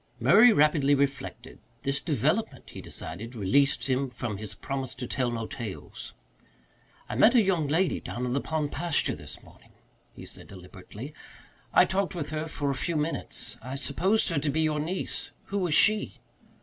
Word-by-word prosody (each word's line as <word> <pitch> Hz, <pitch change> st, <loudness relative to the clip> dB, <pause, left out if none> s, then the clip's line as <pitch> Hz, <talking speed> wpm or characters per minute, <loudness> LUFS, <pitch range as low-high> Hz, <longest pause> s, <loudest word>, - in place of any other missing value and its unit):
Murray 225 Hz, +4 st, +7 dB
rapidly 145 Hz, -4 st, +4 dB
reflected. 140 Hz, -1 st, -2 dB, 0.2 s
This 135 Hz, 0 st, 0 dB
development, 155 Hz, -, 0 dB
he -, -, -8 dB
decided, 115 Hz, +3 st, -7 dB
released 140 Hz, +7 st, +2 dB
him 130 Hz, 0 st, 0 dB
from 120 Hz, -4 st, -4 dB
his 105 Hz, -1 st, -5 dB
promise 135 Hz, +2 st, -4 dB
to 125 Hz, -, -5 dB
tell 125 Hz, 0 st, 0 dB
no 115 Hz, -1 st, -3 dB
tales. 115 Hz, -6 st, -7 dB, 0.9 s
"I -, -, -5 dB
met 220 Hz, -, +6 dB
a 240 Hz, -, +8 dB
young 175 Hz, -6 st, +1 dB
lady 170 Hz, +6 st, +2 dB
down 125 Hz, +1 st, -4 dB
in 125 Hz, -, -1 dB
the 140 Hz, -, +1 dB
pond 155 Hz, -2 st, -2 dB
pasture 170 Hz, 0 st, +1 dB
this -, -, -7 dB
morning," -, -, -19 dB, 0.4 s
he -, -, -11 dB
said -, -, -9 dB
deliberately. 100 Hz, -, -10 dB, 0.6 s
"I -, -, +6 dB
talked 190 Hz, 0 st, -1 dB
with 150 Hz, -3 st, -4 dB
her 155 Hz, +1 st, -2 dB
for 145 Hz, -3 st, -2 dB
a -, -, 0 dB
few 165 Hz, +6 st, -2 dB
minutes. 155 Hz, +2 st, -3 dB
I 130 Hz, +3 st, -6 dB
supposed 185 Hz, +11 st, +1 dB
her 165 Hz, -4 st, +1 dB
to 145 Hz, +1 st, -1 dB
be 155 Hz, +3 st, +1 dB
your 155 Hz, -1 st, +1 dB
niece. 170 Hz, +5 st, -3 dB, 0.2 s
Who 200 Hz, -, 0 dB
was 175 Hz, -5 st, +1 dB
she?" 215 Hz, +3 st, +3 dB
145 Hz, 175 wpm, -28 LUFS, 130-165 Hz, 0.9 s, a